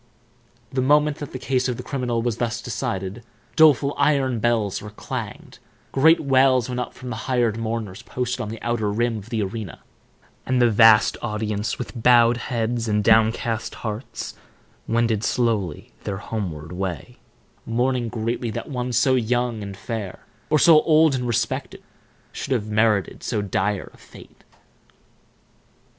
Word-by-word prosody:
The 130 - +1
moment 150 +2 +3
that 145 - -7
the - - -5
case 130 0 0
of 125 -2 -2
the 125 - -6
criminal 125 -3 -2
was 120 -2 -1
thus 115 -2 -2
decided, 95 +4 -4 0.3
doleful 145 -3 +5
iron 135 -5 +2
bells 110 -3 0
were 105 - -8
clanged, 105 - -7 0.3
great 160 +5 +5
wails 130 -3 +3
went 125 -1 -3
up 125 - -5
from 125 -1 -8
the - - -3
hired 120 -4 +2
mourners 110 -3 -4
posted 125 +1 -3
on 105 - -4
the 115 0 -7
outer 120 -3 0
rim 115 +1 0
of 105 +2 -13
the 110 -3 -1
arena, 100 -1 -6 0.6
and 130 -1 0
the 120 -1 +4
vast 110 0 +6
audience, 105 -1 -2
with 125 -1 -6
bowed 120 0 +5
heads 120 -1 -2
and 105 -1 +1
downcast 115 +1 +2
hearts, 110 +3 -5 0.5
wended 115 -2 +1
slowly 110 -12 -1
their 100 - -3
homeward 90 -7 -5
way, 95 - -5 0.5
mourning 120 +1 0
greatly 115 +1 -2
that 110 - -5
one 125 -1 -3
so 125 +3 +3
young 120 -2 0
and 100 -1 -7
fair, 105 -2 -6 0.2
or 155 - +4
so 155 0 +7
old 155 -1 +4
and 125 -2 -2
respected, 120 - -2 0.5
should - - -3
have 115 -5 -1
merited 110 -2 +1
so 110 - -2
dire 100 0 -2
a - - -18
fate. - - -16
115 Hz, 155 wpm, -23 LUFS, 105-125 Hz, 0.6 s, so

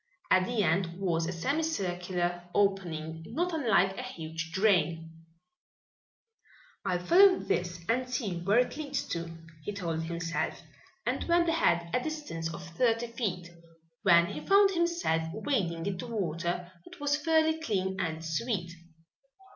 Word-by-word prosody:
At 185 0 +5
the 235 -4 +1
end 170 0 +1
was 165 -4 0
a - - -2
semi 270 - -1
circular 180 - -2
opening, 165 -5 0
not 350 +2 -1
unlike 210 - +3
a - - -4
huge 165 -9 -6
drain. 170 -4 +2 1.7
"I'll 180 -1 -1
follow 375 - +7
this 175 -2 -2
and 250 +2 0
see 215 -9 -2
where 195 +6 +2
it 250 +1 +2
leads 285 -3 -3
to," 170 -1 -3 0.3
he 205 - -3
told 170 -5 -2
himself, 170 0 -2 0.5
and - - -1
went 340 0 +3
ahead 170 - +2
a - - +3
distance 290 - -4
of 175 +1 -8
thirty 230 +5 +1
feet, 180 -7 -3 0.5
when 170 -3 +6
he - - -6
found 395 0 +5
himself 340 - +1
wading 190 - -1
into 200 +3 -3
water 175 -4 -2
that - - -14
was 290 0 +1
fairly 320 +1 +2
clean 190 -7 -1
and 160 -2 -3
sweet. 175 +1 -2
185 Hz, 140 wpm, -30 LUFS, 170-250 Hz, 1.7 s, follow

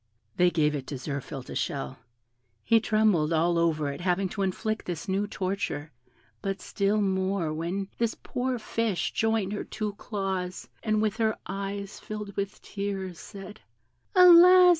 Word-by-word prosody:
They 180 0 +5
gave 155 -3 +2
it 140 -3 -4
to 145 - -4
Zirphil 140 0 -5
to - - -8
shell; 135 -2 -3 0.6
he 230 - +5
trembled 215 -8 +2
all 170 +1 +3
over 155 -3 +1
at 140 - -6
having 185 +1 +1
to 200 +2 -4
inflict 215 +3 -1
this 175 -3 -4
new 195 +2 0
torture, 185 -7 -3 0.5
but 195 0 -2
still 205 +1 +1
more 190 -4 0
when 175 +5 -2
this 230 -1 +1
poor 250 0 -2
fish 225 -3 -1
joined 220 -3 +1
her 210 - -3
two 215 -1 -4
claws, 190 -4 -3
and, 215 -1 +1
with 215 0 0
her 220 -2 +1
eyes 200 +1 -5
filled 210 -2 -6
with 200 0 -4
tears, 195 -3 -4
said, 200 +2 -10 0.6
"Alas! 360 0 +9
195 Hz, 155 wpm, -28 LUFS, 175-215 Hz, 0.6 s, Alas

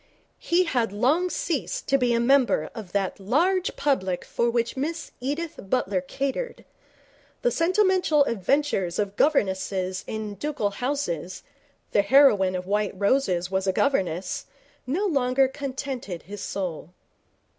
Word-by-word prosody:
He 350 +2 +2
had 245 - 0
long 275 - +2
ceased 325 -5 -2
to 275 - +4
be 245 -1 +2
a 235 - +2
member 260 +1 +3
of 215 -6 -8
that 195 -1 -1
large 345 - +1
public 190 -11 0
for 235 - 0
which 235 0 0
Miss 320 +5 -3
Edith 295 +6 -3
Butler 195 -7 +1
catered. 275 - -4 0.8
The - - +3
sentimental 365 -4 +3
adventures 215 -5 0
of 205 -1 -1
governesses 190 -8 +1
in 215 -1 -4
ducal 275 -3 -2
houses 200 - -3 0.5
the 205 - +4
heroine 205 -5 +5
of 180 0 -4
White 205 -1 -1
Roses 190 -5 +1
was 190 0 0
a - - +4
governess 190 - 0 0.4
no 345 +11 0
longer 270 -6 +2
contented 265 -8 -5
his 205 +1 -8
soul. 180 -5 -4
245 Hz, 135 wpm, -25 LUFS, 190-285 Hz, 0.8 s, heroine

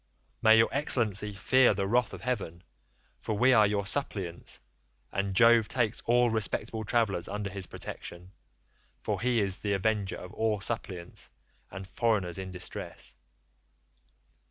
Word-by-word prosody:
May 110 0 +7
your 115 - +5
excellency 110 -7 +1
fear 125 +3 +3
the 100 0 -1
wrath 120 0 +2
of 95 - -9
heaven, 100 -9 -3 0.6
for 105 - -3
we 130 +4 +5
are 110 -3 +6
your 100 -1 -1
suppliants, 95 -8 -3 0.5
and 100 -1 -2
Jove 115 0 +6
takes 115 -2 -1
all 120 0 +4
respectable 110 +1 -1
travellers 105 -5 0
under 100 0 -4
his 95 -1 -4
protection, 90 +2 -8 0.7
for - - -3
he 125 -1 +2
is 95 -3 0
the 100 -1 -1
avenger 100 0 0
of 90 +2 -10
all 110 -2 0
suppliants 95 -5 -5 0.4
and 95 -1 -8
foreigners 95 -5 0
in 95 0 -5
distress. 90 -1 -5
105 Hz, 140 wpm, -29 LUFS, 95-115 Hz, 0.7 s, May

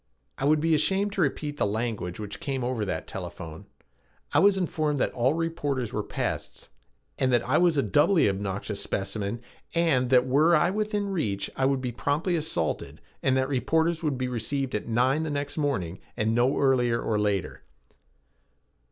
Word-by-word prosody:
I 135 - -1
would 150 +1 +4
be 165 +1 +2
ashamed 195 +6 +2
to 195 - 0
repeat 145 0 -1
the - - +1
language 110 -4 -3
which 105 -1 -6
came 135 -3 -3
over 120 -3 -1
that 95 - -3
telephone. 80 -1 -7 0.7
I - - +5
was 200 0 +5
informed 155 -5 0
that - - 0
all 130 +5 +2
reporters 145 -8 -2
were - - 0
pests - - -4 0.5
and 130 -1 +2
that 120 -1 +2
I 140 +4 +3
was 175 -3 +3
a 140 - +3
doubly 145 - +4
obnoxious 100 +1 -3
specimen 100 +3 -3 0.3
and 140 -7 +2
that 125 -1 +5
were 150 +6 +4
I 175 +3 +3
within 210 0 -1
reach 110 - -2
I 130 - +1
would 135 -1 +1
be 125 -2 -2
promptly 145 - 0
assaulted 150 - -2 0.2
and 130 0 +2
that 130 0 +1
reporters 160 +5 +1
would 150 -5 -1
be 130 0 -1
received 125 +3 -2
at 105 - -3
nine 125 +6 +2
the 160 - -2
next 145 -1 -3
morning 125 - -1 0.2
and 110 +1 +1
no 120 +3 +2
earlier 125 -4 +3
or 110 -2 0
later. 100 -2 -1
135 Hz, 180 wpm, -27 LUFS, 115-155 Hz, 0.7 s, I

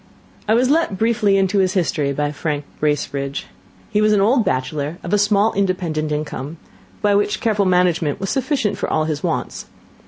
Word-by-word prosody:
I 220 - +4
was 250 +3 +3
let 315 - +1
briefly 215 -2 +2
into 195 +1 +2
his 185 -1 +2
history 155 -6 0
by 145 +1 -1
Frank 150 -1 -3
Bracebridge. 140 -2 -2 0.5
He 210 -1 +2
was 215 0 +4
an 205 - +3
old 230 +5 +3
bachelor 145 +2 -2
of 180 - -4
a 210 - +4
small 205 +1 +3
independent 175 -6 -1
income, 150 0 -4 0.5
which 205 0 +2
by - - -13
careful 210 -3 +2
management 180 -3 +2
was 195 -1 -3
sufficient 265 -5 -1
for - - -2
all 155 - +2
his 155 -2 -2
wants. - - -3
185 Hz, 180 wpm, -20 LUFS, 150-210 Hz, 0.5 s, I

